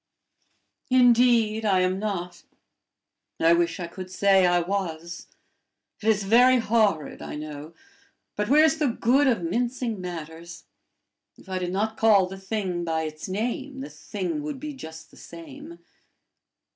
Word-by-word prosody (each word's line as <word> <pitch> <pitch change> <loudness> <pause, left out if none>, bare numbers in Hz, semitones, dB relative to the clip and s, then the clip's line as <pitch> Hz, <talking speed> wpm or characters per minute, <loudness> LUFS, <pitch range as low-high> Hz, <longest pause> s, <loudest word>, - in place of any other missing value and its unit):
"Indeed, 240 -3 +4
I 195 -3 +2
am 185 +1 0
not. 180 -4 -4 1.0
I 165 +1 +5
wish 170 0 0
I 175 - -3
could 185 +2 -9
say 190 0 +3
I 175 0 +3
was! 170 -2 -4 0.7
It 215 - -4
is 210 -2 +2
very 245 +5 +5
horrid, 215 - 0
I - - -7
know, 150 +1 -8 0.6
but 210 +1 -2
where's 310 +3 +4
the 300 - +2
good 250 +4 +2
of 225 -9 +1
mincing 235 +3 -2
matters? 170 -1 -8 0.7
If - - -19
I 185 -1 -3
did 180 -1 -3
not 215 +3 -2
call 210 -4 +5
the 190 +1 -9
thing 190 -3 -3
by 160 -1 -1
its 155 +2 -7
name, 250 +7 -3
the 275 - -8
thing 210 - -4
would 295 -2 -5
be 300 +1 -6
just 160 - -11
the - - -18
same. 315 +1 -11
200 Hz, 145 wpm, -25 LUFS, 175-245 Hz, 1.0 s, I